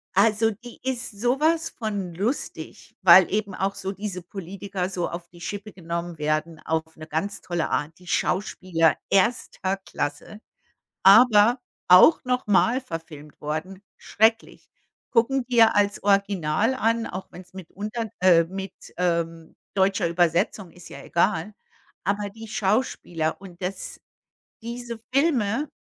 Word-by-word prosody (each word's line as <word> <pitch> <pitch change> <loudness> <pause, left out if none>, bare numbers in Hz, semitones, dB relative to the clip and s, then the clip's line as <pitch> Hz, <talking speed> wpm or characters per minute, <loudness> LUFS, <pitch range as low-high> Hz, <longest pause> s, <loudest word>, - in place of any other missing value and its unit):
Also, 215 +2 +3
die 235 +3 -12
ist 255 -2 -2
sowas 310 +7 +1
von 205 -6 -4
lustig, 210 - -4
weil 190 +1 +7
eben 205 -2 -1
auch 195 +1 -1
so 195 0 -4
diese 195 -2 -5
Politiker 190 +1 -5
so 180 -2 -2
auf 170 0 -7
die 175 -1 -16
Schippe 205 +2 -6
genommen 170 -1 -5
werden 155 +2 -1
auf 160 0 -3
'ne 155 0 -10
ganz 200 +7 -3
tolle 175 -2 -2
Art, 155 +2 -2
die 180 - -17
Schauspieler 175 -6 +1
erster 195 -2 +1
Klasse, 150 +1 -5 0.6
aber 235 0 +7 0.3
auch 180 - +7
nochmal 250 -1 +2
verfilmt 160 - -9
worden, 160 +6 -4 0.2
schrecklich. 225 +1 0 0.4
Gucken 255 +3 +2
wir 230 -3 +5
als 205 -1 +1
Original 200 +1 +1
an, 230 -1 0
auch 185 +1 -7
wenn's 180 +1 -13
mit 190 -3 -10
unter 215 +3 -4
äh, 175 -3 +6
mit, 190 +2 -7 0.2
ähm, 170 -2 -2 0.2
deutscher 190 -2 +2
Übersetzung, 175 +3 +1
ist 175 -1 -14
ja - - -10
egal. 185 +3 0 0.5
Aber 200 +2 -1
die 225 +2 -11
Schauspieler 190 -6 -1
und 180 -3 -12
das, 185 +1 -5 0.6
diese 235 0 -6
Filme, 275 -2 +1
195 Hz, 130 wpm, -24 LUFS, 170-225 Hz, 0.6 s, weil